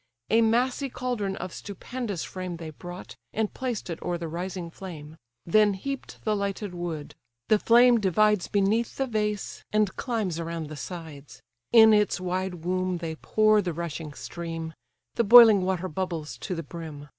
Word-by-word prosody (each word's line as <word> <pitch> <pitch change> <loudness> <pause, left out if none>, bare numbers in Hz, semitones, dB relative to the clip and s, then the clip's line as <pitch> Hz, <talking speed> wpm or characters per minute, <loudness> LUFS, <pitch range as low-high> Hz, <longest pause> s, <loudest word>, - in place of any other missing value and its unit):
A 225 - +5
massy 245 +4 +1
caldron 235 -7 -2
of 185 -2 -6
stupendous 205 -1 -5
frame 185 -2 -5
They 160 -1 -7
brought, 175 +4 -9 0.2
and 220 -1 -1
placed 250 -5 -3
it 170 -2 -5
o'er 175 -1 -2
the 170 -1 -5
rising 175 +1 -5
flame: 160 -5 -9 0.3
Then 205 +3 +4
heap'd 275 +7 -6
the 215 -1 +1
lighted 200 -1 -3
wood; 170 -4 -5 0.4
the 215 - +5
flame 240 +1 +6
divides 210 0 +2
Beneath 210 +3 +1
the 270 - +1
vase, 210 -4 -2
and 210 -2 +1
climbs 215 -9 -2
around 165 -2 -4
the 155 - -7
sides: 150 -5 -9 0.3
In 220 -2 +8
its 210 -2 +2
wide 180 -2 -3
womb 185 0 0
they 165 -1 -4
pour 215 +3 +3
the 180 -3 -3
rushing 160 -2 -5
stream; 165 0 -6 0.4
The 235 - +4
boiling 225 -2 +9
water 185 0 -1
bubbles 165 -7 -4
to 180 - -4
the 165 - -4
brim. 155 -4 -8
185 Hz, 165 wpm, -27 LUFS, 170-215 Hz, 0.4 s, boiling